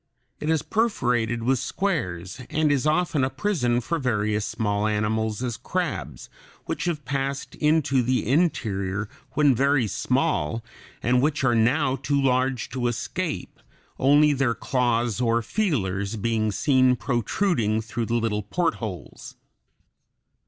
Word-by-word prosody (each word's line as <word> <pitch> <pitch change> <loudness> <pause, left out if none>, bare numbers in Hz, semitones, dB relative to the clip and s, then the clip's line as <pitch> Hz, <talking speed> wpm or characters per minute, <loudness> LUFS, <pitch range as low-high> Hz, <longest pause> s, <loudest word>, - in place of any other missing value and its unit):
It 150 - -3
is 160 -1 +2
perforated 120 - 0
with 130 +1 +2
squares, 130 - -2
and 155 -1 +2
is 145 +1 +1
often 155 -3 +1
a 130 - +1
prison 135 -5 0
for 165 +8 -2
various 105 -5 0
small 105 -1 -1
animals, 110 +1 -1
as 120 -3 -2
crabs, - - -3 0.4
which - - -3
have 155 -6 -2
passed 135 +1 -3
into 150 -4 +2
the 125 -2 0
interior 105 - 0 0.3
when 145 -1 +4
very 135 0 +2
small 105 +1 0 0.4
and 125 +1 +3
which 145 0 0
are 120 -2 +3
now 130 +4 +2
too 140 0 0
large 130 -2 +1
to 125 -2 -1
escape, 120 - -3 0.4
only 145 +2 +5
their 130 -4 +1
claws 120 -2 0
or 115 -1 +2
feelers 105 - -1
being 110 0 0
seen 130 +3 +3
protruding 120 - 0
through 115 +1 -4
the 120 - 0
little 110 -3 0
portholes. 105 - -4
125 Hz, 130 wpm, -25 LUFS, 110-145 Hz, 0.4 s, only